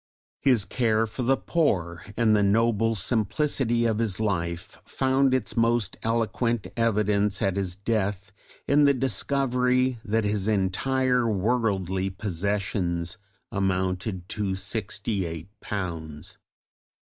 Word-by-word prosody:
His 125 -8 +3
care 115 +1 +1
for 115 +4 -6
the 130 +2 +2
poor 90 - 0
and 110 -2 +4
the 105 - +3
noble 115 +2 +2
simplicity 120 - +1
of 110 -2 +1
his 110 -5 -1
life 85 -5 -2
found 135 0 +1
its 130 -4 0
most 115 -3 +1
eloquent 115 0 0
evidence 105 -3 +1
at 95 -2 0
his 95 -2 -2
death 100 -1 -2 0.4
in 145 +1 +5
the 140 -1 +4
discovery 130 0 +1
that 110 +1 0
his 105 -1 0
entire 125 +5 +1
worldly 95 -3 0
possessions 95 -2 -2 0.3
amounted 95 -1 -1
to 100 -3 -2
sixty 100 +1 -3
eight 80 +2 -7
pounds. 80 -7 -5
105 Hz, 115 wpm, -26 LUFS, 95-120 Hz, 0.4 s, in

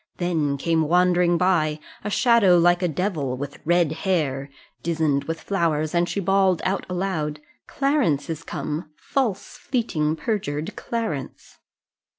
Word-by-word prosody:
Then 160 -6 0
came 160 +1 +1
wandering 175 0 +3
by, 165 -4 +2 0.2
A 210 - -2
shadow 215 -5 +5
like 175 +1 +4
a 180 - +2
devil, 155 -6 -2
with 145 +1 -6
red 175 -2 +3
hair, 150 -6 -1 0.3
'Dizen'd 155 -4 0
with 165 0 -3
flowers; 160 -5 0
and 175 0 +2
she - - -2
bawl'd 195 -1 +3
out 190 +1 -1
aloud, 170 -5 -2 0.3
Clarence 275 - +1
is 165 -1 -4
come; 155 -1 -4
false, 205 - -2
fleeting, 160 - -1
perjured 160 -7 -3
Clarence!" 220 - -5
170 Hz, 135 wpm, -23 LUFS, 150-190 Hz, 0.3 s, shadow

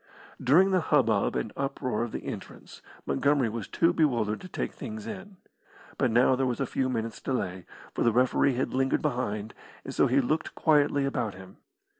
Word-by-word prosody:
During 170 +10 +5
the 185 -1 +3
hubbub 115 -10 +2
and 110 - -3
uproar 135 -4 -2
of 120 -1 -2
the - - -5
entrance - - -8 0.2
Montgomery 130 - +2
was 110 -1 -5
too 170 +1 +2
bewildered 120 -10 +1
to - - -9
take - - -4
things 220 -2 -7
in. 200 -3 -8 0.6
But 130 - +3
now 125 +3 +4
there 130 0 0
was 125 +1 -2
a 135 - +1
few 130 +1 -1
minutes' 115 -2 -3
delay, 95 -9 -3 0.3
for - - -3
the 115 - +4
referee 125 +3 +2
had 130 - -2
lingered 130 +1 +1
behind, 110 -7 -2 0.3
and - - -6
so - - +3
he 130 +3 +3
looked 155 +5 -1
quietly 145 -3 +3
about 120 -7 -2
him. 95 0 -13
130 Hz, 185 wpm, -28 LUFS, 115-150 Hz, 0.6 s, During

